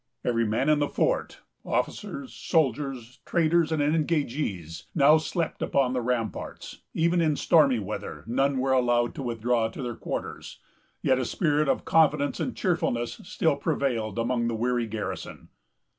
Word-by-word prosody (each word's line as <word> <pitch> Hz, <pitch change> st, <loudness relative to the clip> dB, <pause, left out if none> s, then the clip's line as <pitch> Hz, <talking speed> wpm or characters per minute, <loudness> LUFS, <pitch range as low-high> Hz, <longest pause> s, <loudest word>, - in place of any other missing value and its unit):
Every 115 Hz, -2 st, +1 dB
man 115 Hz, +6 st, 0 dB
in 155 Hz, -1 st, +4 dB
the 145 Hz, -, 0 dB
fort, -, -, -1 dB, 0.2 s
officers, 280 Hz, -3 st, -3 dB
soldiers, 135 Hz, -, -1 dB
traders, 170 Hz, -1 st, +2 dB
and 155 Hz, -2 st, +1 dB
engagés, 145 Hz, -, -1 dB
now 150 Hz, +1 st, +6 dB
slept 165 Hz, +1 st, -3 dB
upon 130 Hz, -2 st, +1 dB
the 125 Hz, -, 0 dB
ramparts; 115 Hz, -4 st, -3 dB, 0.2 s
even 170 Hz, +1 st, +2 dB
in 155 Hz, -2 st, +2 dB
stormy 145 Hz, -5 st, +4 dB
weather 105 Hz, 0 st, -5 dB
none 135 Hz, +4 st, +1 dB
were 130 Hz, +1 st, +1 dB
allowed 120 Hz, -2 st, +2 dB
to -, -, -6 dB
withdraw 120 Hz, -1 st, 0 dB
to 115 Hz, +4 st, -7 dB
their 120 Hz, -1 st, -3 dB
quarters; -, -, -6 dB, 0.5 s
yet 130 Hz, 0 st, +3 dB
a 130 Hz, -, -1 dB
spirit 150 Hz, 0 st, +1 dB
of -, -, 0 dB
confidence 150 Hz, -3 st, +3 dB
and 255 Hz, -, -3 dB
cheerfulness 140 Hz, -, -1 dB
still 160 Hz, -4 st, +1 dB
prevailed 130 Hz, -, -1 dB
among 120 Hz, 0 st, 0 dB
the 115 Hz, -, -1 dB
weary 120 Hz, +1 st, 0 dB
garrison. 110 Hz, 0 st, -6 dB
135 Hz, 150 wpm, -27 LUFS, 120-155 Hz, 0.5 s, now